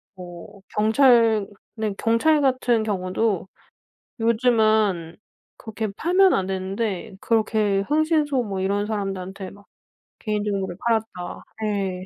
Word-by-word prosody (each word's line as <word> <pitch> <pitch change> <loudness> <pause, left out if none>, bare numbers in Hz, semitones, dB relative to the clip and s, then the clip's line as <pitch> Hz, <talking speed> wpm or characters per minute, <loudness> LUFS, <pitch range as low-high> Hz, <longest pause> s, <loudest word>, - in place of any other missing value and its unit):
뭐 180 +2 -11 0.2
경찰 225 -1 +4 0.3
네 215 -2 -1
경찰 290 +7 +2
같은 255 -4 +2
경우도 195 -1 -1 0.7
요즘은 220 -7 +2 0.4
그렇게 220 0 -5
팔면 370 - +4
안 190 -1 0
되는데 195 +2 -3
그렇게 215 -3 +1
흥신소 300 +1 +1
뭐 200 -4 -4
이런 200 +2 0
사람들한테 195 -2 -4
막 200 0 -17 0.5
개인 210 -2 -2
정보를 195 -4 -3
팔았다 220 -6 -2 0.2
예. 195 -3 -2
215 Hz, 235 characters per minute, -23 LUFS, 195-230 Hz, 0.7 s, 경찰